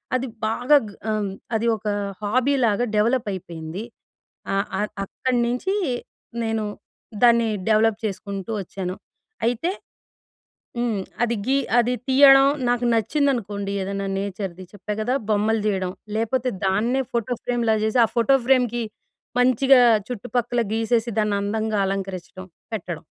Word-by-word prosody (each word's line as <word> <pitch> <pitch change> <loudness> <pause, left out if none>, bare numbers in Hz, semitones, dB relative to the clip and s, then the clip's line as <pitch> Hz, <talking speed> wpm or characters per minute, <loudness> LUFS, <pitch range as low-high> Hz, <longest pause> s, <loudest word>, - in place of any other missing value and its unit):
అది 255 +1 -1 0.2
బాగా 245 +6 +4
గ్ - - -12 0.2
ఆహ్, 210 -2 -1 0.2
అది 220 +1 0
ఒక 215 - -8 0.4
హాబీలాగా 245 0 +2
డెవలప్పయిపోయింది. 200 -6 -1 0.7
ఆహ్, 195 - 0
ఆహ్, 210 - -1
అక్కడ 255 +6 -3
నించీ 250 +11 -1 0.7
నేను 225 -1 -1 0.6
దాన్ని 235 -1 +5 0.2
డెవలప్ 220 0 +3
చేసుకుంటూ 195 0 -5
ఒచ్చాను. 185 0 -5 0.5
అయితే 245 +8 0 1.1
హ్మ్. 235 -4 0 0.2
అది 235 0 +2
గీ 270 +1 +3 0.2
అది 240 +1 +2
తీయడం 270 0 +8 0.2
నాకు 245 0 +1
నచ్చిందనుకోండి, 225 -5 0
ఏదన్నా 195 +1 -3
నేచర్‌ది, 195 -2 -5
చెప్పా 205 0 -6
గదా! 245 +4 0 0.2
బొమ్మలు 215 +1 +2
తీయడం, 190 -3 0 0.2
లేపోతే 240 +3 0 0.2
దాన్నే 230 +8 +1
ఫోటో 235 +1 -1
ఫ్రేమ్‌లా 235 -2 +1
జేసి, 220 +3 +1
ఆ - - +3
ఫోటో 235 +4 +5
ఫ్రేమ్‌కి 245 -3 +3 0.6
మంచిగా 255 +1 +5 0.3
చుట్టుపక్కల 240 +1 -1
గీసేసి, 225 +1 +1
దాన్నందంగా 210 +1 0
అలంకరిచ్చటం, 190 -1 -5 0.3
పెట్టడం. 175 -6 -5
225 Hz, 115 wpm, -23 LUFS, 200-245 Hz, 1.1 s, తీయడం